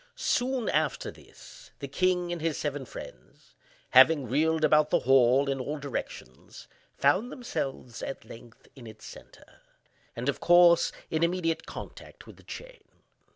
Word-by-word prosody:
Soon 255 - -1
after 155 -4 -1
this, - - -16
the 140 - -7
king 180 +4 0
and 175 -2 -4
his 160 -2 -1
seven 145 -2 -3
friends - - -12 0.4
having 135 +1 +6
reeled 155 +5 +1
about 150 0 +4
the - - +2
hall 130 +1 +4
in 135 -1 -1
all 145 +4 -4
directions, 135 - -8 0.3
found 185 - +2
themselves, 135 - -5
at 135 - -6
length, 115 0 -14
in 125 -4 -12
its 110 0 -13
centre, - - -15 0.5
and, 120 +3 -5
of 140 - -1
course, 175 0 +5 0.2
in 160 - -1
immediate 170 -1 -1
contact - - -10
with - - -14
the - - -17
chain. - - -10
150 Hz, 150 wpm, -28 LUFS, 135-175 Hz, 0.5 s, having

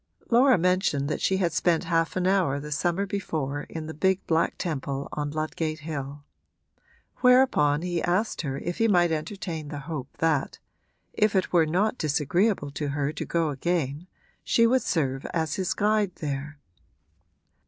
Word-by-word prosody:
Laura 250 +2 +6
mentioned 180 -5 +1
that - - -2
she 190 - +2
had 175 -4 0
spent 170 -1 +2
half 165 -1 0
an 180 -1 0
hour 185 -8 +2
the 150 +1 -8
summer 175 +6 0
before 155 -8 -3
in 160 -1 -6
the 160 - -6
big 190 +4 +1
black 165 0 +1
temple 140 -4 -3
on 145 -1 -3
Ludgate 155 +1 -3
Hill; 145 -2 -6 0.9
whereupon 250 - +4
he 175 -1 -1
asked 185 +6 0
her 135 -4 -3
if 175 +4 -4
he 225 - +4
might 175 -5 +3
entertain 160 0 -4
the 145 -1 -6
hope 140 -3 -5
that 160 -4 0 0.6
if 210 -1 +2
it 190 - 0
were 165 -3 +4
not 205 +9 0
disagreeable 155 +3 +1
to 145 +1 -3
her 145 +1 -1
to - - -4
go 165 -2 0
again 150 +1 -2 0.4
she 230 - +3
would 255 +2 +3
serve 135 -5 -1
as 160 -2 0
his 185 -1 -1
guide 210 -2 +1
there. 145 0 -5
165 Hz, 165 wpm, -26 LUFS, 145-185 Hz, 0.9 s, Laura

